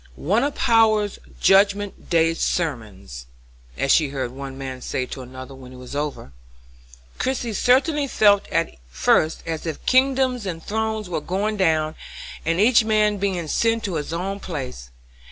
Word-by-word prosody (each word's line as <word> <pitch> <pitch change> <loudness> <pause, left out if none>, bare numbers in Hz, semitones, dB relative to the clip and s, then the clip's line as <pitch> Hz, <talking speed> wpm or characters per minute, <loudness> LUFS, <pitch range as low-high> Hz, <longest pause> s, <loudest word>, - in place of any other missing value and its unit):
"One 205 - +1
of 285 0 -1
Power's 215 -3 +3 0.2
judgment 200 +1 +2
day 165 -1 +3
sermons," 105 - -3 0.5
as 135 - +1
she 155 -4 +4
heard 130 -3 -3
one 135 0 -8
man 130 -1 -6
say 130 - -2
to 130 - -8
another, 130 +1 -10
when 130 -1 -12
it - - -11
was 125 +2 -9
over. 145 - -4 0.9
Christie 250 -3 -1
certainly 280 - +2
felt 205 -5 +4
at 165 - -1
first 155 - +1
as 165 0 -4
if 160 - -5
kingdoms 255 -3 +2
and 165 -3 -5
thrones 220 -1 -2
were 170 -3 -3
going 200 +7 -2
down, 155 -4 +1 0.5
and 165 +2 0
each 225 +2 +5
man 215 -1 +2
being 185 -4 -2
sent 230 +7 +1
to 195 - -3
his 155 -1 -3
own 190 +4 -3
place. 130 - -6
175 Hz, 155 wpm, -22 LUFS, 140-215 Hz, 0.9 s, each